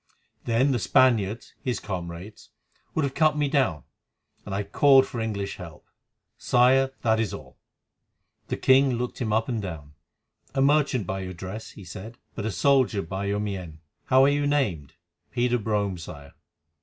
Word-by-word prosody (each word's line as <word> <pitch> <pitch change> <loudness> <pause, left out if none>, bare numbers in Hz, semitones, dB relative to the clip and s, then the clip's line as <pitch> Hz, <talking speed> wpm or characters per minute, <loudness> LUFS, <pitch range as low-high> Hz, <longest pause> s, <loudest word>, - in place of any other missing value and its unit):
Then 125 +4 +2
the 125 - +1
Spaniards—his 120 +2 +1
comrades—would 95 - -7
have 135 - -3
cut 155 0 +3
me 145 -1 +1
down, 130 - +1 0.6
and 95 - -3
I 100 - -1
called 135 +4 +5
for 120 - -6
English 105 -3 -3
help. 85 -5 -11 0.5
Sire, 130 +2 +4
that 110 -2 +3
is 115 - -1
all." - - -13 0.9
The - - -3
king 130 0 +4
looked 125 +2 -4
him 110 -3 -1
up 110 +1 +1
and 120 -4 -2
down. 80 -7 -7 0.6
"A 135 - +2
merchant 140 -6 +2
by 95 +2 -3
your 95 -1 -5
dress," 95 +5 -8
he 100 - -12
said; 95 +6 -9 0.2
"but 110 -1 -4
a - - -1
soldier 130 0 +2
by 95 +4 -4
your 100 +1 -1
mien. 95 -6 -5 0.3
How 130 0 +5
are - - +6
you 145 0 +1
named?" 100 - -1 0.4
"Peter 125 0 +1
Brome, 100 -4 -1
Sire." 70 -4 -10
110 Hz, 160 wpm, -26 LUFS, 95-130 Hz, 0.9 s, are